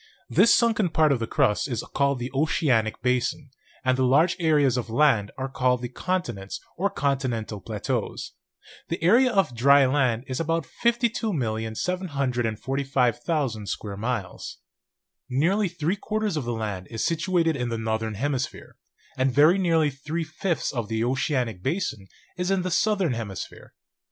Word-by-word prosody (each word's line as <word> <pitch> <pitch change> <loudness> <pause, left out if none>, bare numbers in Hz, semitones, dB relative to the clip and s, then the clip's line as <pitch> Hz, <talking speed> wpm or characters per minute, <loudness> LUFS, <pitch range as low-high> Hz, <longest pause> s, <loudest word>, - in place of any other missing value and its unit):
This 230 - +5
sunken 220 -5 +3
part 155 -2 +3
of 135 - +1
the 115 - -3
crust 105 +2 +1
is 120 -4 -3
called 140 -1 +2
the 125 +1 -5
oceanic 130 -7 +1
basin, 125 +3 0 0.3
and 130 0 +3
the 130 - +1
large 150 +8 +4
areas 150 -6 +3
of 120 -2 -3
land 115 -5 +3
are 135 0 -2
called 125 -2 0
the 120 - -3
continents 120 - -3 0.2
or 200 +3 0
con 140 -6 0
tinental 115 -6 -4
plateaus. - - -3 0.6
The 165 -1 -3
area 245 +9 +5
of 195 -8 +2
the - - -14
dry 140 +3 +6
land 130 -4 +1
is 130 -1 -4
about 165 -1 0
52, 235 - 0 0.4
745,000 135 - -1
square 100 -2 -4
miles. 110 -3 -4 0.7
"Nearly 175 +11 +2
three 175 +2 -2
quarters 215 -2 -2
of 150 -5 -2
the 120 - -2
land 105 -5 -4
is 115 -1 -2
situated 165 -1 +1
in 125 -3 -2
the 115 - -2
northern 110 -1 -2
hemisphere, 130 +3 -3 0.4
and 130 +1 +2
very 155 +8 +5
nearly 165 -5 +2
three 150 +5 -4
fifths 160 +2 -2
of 120 -5 -3
the 110 +1 -1
oceanic 125 - -1
basin 135 - -2 0.3
in 180 +1 0
the 185 - -2
southern 195 -5 +2
hemisphere. 105 -5 -7
140 Hz, 155 wpm, -25 LUFS, 120-170 Hz, 0.7 s, dry